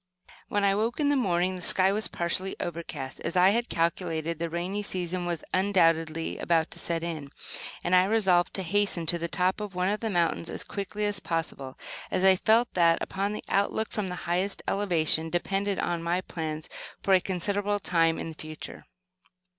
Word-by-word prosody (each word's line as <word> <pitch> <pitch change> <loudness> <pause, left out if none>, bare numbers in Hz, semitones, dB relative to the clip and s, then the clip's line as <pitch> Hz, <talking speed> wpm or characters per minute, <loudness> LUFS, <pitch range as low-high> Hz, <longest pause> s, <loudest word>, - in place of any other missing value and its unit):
When 205 0 0
I 200 - +5
awoke 220 +6 0
in 290 -1 +3
the 290 - +3
morning 185 -6 +1
the 180 - -7
sky 185 +2 +3
was 215 +2 0
partially 180 +3 -1
overcast. 165 -5 -5
As 175 - -2
I 180 +1 +7
had 235 +3 0
calculated, 165 -1 -1
the 170 0 -2
rainy 180 +5 -2
season 180 -2 -2
was 170 -2 -2
undoubtedly 165 -4 +2
about 165 -1 +1
to - - -5
set 165 -1 -2
in, 155 -4 -4 0.5
and 175 - 0
I 180 0 +6
resolved 190 -4 +3
to 190 - -2
hasten 195 -2 +1
to 170 +2 +2
the 170 - -2
top 185 +3 0
of 205 -3 -6
one 180 +1 +1
of 210 +1 0
the 225 - -2
mountains 170 -3 0
as - - -3
quickly 205 +1 -4
as 205 -1 +2
possible, 160 -7 -3 0.3
as 185 - 0
I 190 0 +7
felt 225 +5 +3
that, 170 -2 +4
upon 200 +2 -2
the 210 - -5
outlook 200 +2 0
from 210 -3 -2
the 180 - -4
highest 180 +3 -1
elevation 165 -5 +2
depended 195 +3 0
my 170 +1 0
plans 160 -3 -5 0.4
for 195 - +3
a 185 - +6
considerable 205 +3 -1
time 165 -3 +2
in - - -4
the - - -7
future. 155 0 -8
180 Hz, 190 wpm, -28 LUFS, 165-200 Hz, 0.5 s, I